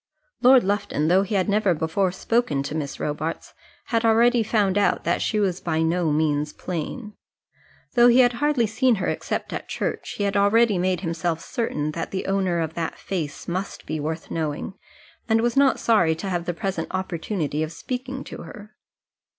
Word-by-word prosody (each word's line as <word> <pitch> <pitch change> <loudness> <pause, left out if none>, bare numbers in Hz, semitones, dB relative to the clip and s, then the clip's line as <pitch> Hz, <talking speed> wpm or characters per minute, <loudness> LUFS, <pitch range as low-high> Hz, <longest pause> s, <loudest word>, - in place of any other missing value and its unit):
Lord 255 0 +7
Lufton, 190 -6 0
though 185 +2 +5
he 200 +2 -2
had 190 -2 +1
never 205 -3 +2
before 160 +5 0
spoken 190 - 0
to 140 - -5
Miss 145 -4 -4
Robarts, 155 +2 -4 0.4
had 230 0 +2
already 230 +2 +4
found 210 -3 +1
out 205 - +2
that - - 0
she 215 - 0
was 190 -3 0
by 160 -1 0
no 165 -1 +1
means 150 -1 0
plain. 185 - -5 0.8
Though 240 -1 +6
he 245 +2 +6
had 245 -1 +4
hardly 295 -5 +3
seen 230 +3 +2
her 195 - -3
except - - -3
at - - -5
church, - - -3
he 205 - -1
had 200 0 0
already 205 0 +4
made 185 0 0
himself 165 -1 -2
certain 165 - -2
that 165 +1 -4
the 190 - -4
owner 190 -3 0
of 160 -1 -3
that 165 -1 -3
face 160 -7 -5
must 185 +3 -4
be 155 +1 -3
worth 160 +2 -4
knowing, 155 +2 -3 0.6
and 225 0 +4
was 240 +1 0
not 275 -1 +4
sorry 175 -9 +3
to 180 +5 -5
have 175 -2 -2
the 175 - -2
present 185 -3 -3
opportunity 170 -4 -2
of 155 0 -2
speaking 255 +8 -5
to - - -9
her. 210 +1 -11
190 Hz, 185 wpm, -24 LUFS, 160-220 Hz, 0.8 s, Lord